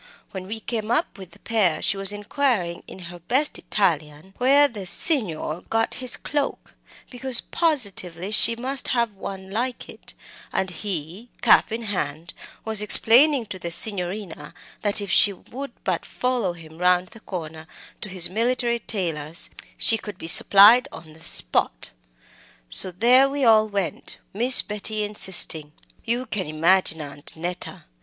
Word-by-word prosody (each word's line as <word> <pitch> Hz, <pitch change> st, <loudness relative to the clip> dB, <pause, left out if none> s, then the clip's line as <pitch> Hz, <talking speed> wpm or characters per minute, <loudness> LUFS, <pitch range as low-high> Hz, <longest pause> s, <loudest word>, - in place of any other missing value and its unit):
When 185 Hz, -1 st, -8 dB
we 220 Hz, +2 st, -6 dB
came 220 Hz, -1 st, -5 dB
up 240 Hz, -2 st, -2 dB
with 190 Hz, -2 st, -11 dB
the 170 Hz, -, -20 dB
pair 210 Hz, -8 st, -1 dB
she -, -, 0 dB
was 195 Hz, 0 st, +5 dB
inquiring, 205 Hz, -4 st, -2 dB
in -, -, -11 dB, 0.2 s
her 175 Hz, -, -12 dB
best 260 Hz, -, -1 dB
Italian, 160 Hz, -2 st, -3 dB
where 280 Hz, +3 st, +4 dB
the 205 Hz, -7 st, -8 dB
'Signor' 180 Hz, -, -1 dB
got 225 Hz, 0 st, -1 dB
his 255 Hz, -1 st, +4 dB
cloak, 290 Hz, -1 st, -5 dB, 0.4 s
because 250 Hz, -1 st, +5 dB
positively 200 Hz, -, -1 dB
she 230 Hz, +2 st, +4 dB
must 260 Hz, +3 st, -2 dB
have 235 Hz, -3 st, 0 dB
one 190 Hz, -1 st, -9 dB
like 245 Hz, +4 st, -4 dB
it, -, -, -12 dB, 0.4 s
and 190 Hz, -1 st, -2 dB
he, 180 Hz, +4 st, -6 dB
cap 230 Hz, -1 st, +4 dB
in 230 Hz, +1 st, -5 dB
hand, 170 Hz, -5 st, -5 dB, 0.3 s
was 220 Hz, -2 st, +2 dB
explaining 245 Hz, +5 st, +5 dB
to 190 Hz, -3 st, -9 dB
the 170 Hz, -, -6 dB
Signorina 180 Hz, -4 st, -2 dB, 0.3 s
that 205 Hz, 0 st, +1 dB
if 200 Hz, -, -6 dB
she 205 Hz, -, +4 dB
would 270 Hz, +8 st, -10 dB
but -, -, -2 dB
follow 245 Hz, -8 st, -3 dB
him 160 Hz, -1 st, -14 dB
round 180 Hz, 0 st, +1 dB
the 225 Hz, -, -16 dB
corner 160 Hz, -5 st, -8 dB, 0.3 s
to 210 Hz, -, -4 dB
his 180 Hz, -2 st, +3 dB
military 235 Hz, +3 st, -1 dB
tailor's, 165 Hz, -7 st, -4 dB, 0.3 s
she 225 Hz, -2 st, +2 dB
could 205 Hz, -3 st, -10 dB
be -, -, -10 dB
supplied 205 Hz, +8 st, +7 dB
on 160 Hz, -1 st, -13 dB
the 160 Hz, +1 st, -17 dB
spot. -, -, -1 dB, 0.8 s
So 185 Hz, -, +5 dB
there 245 Hz, +9 st, +3 dB
we 280 Hz, -1 st, -2 dB
all 215 Hz, -1 st, +4 dB
went, 200 Hz, -4 st, -4 dB, 0.2 s
Miss 245 Hz, +5 st, +6 dB
Betty 210 Hz, +1 st, -4 dB
insisting. 180 Hz, -7 st, +1 dB, 0.3 s
You 240 Hz, +2 st, -2 dB
can 200 Hz, -8 st, -4 dB
imagine 160 Hz, +1 st, +1 dB
Aunt 145 Hz, -1 st, -9 dB
Neta. 175 Hz, +2 st, -7 dB
205 Hz, 155 wpm, -22 LUFS, 175-235 Hz, 0.8 s, supplied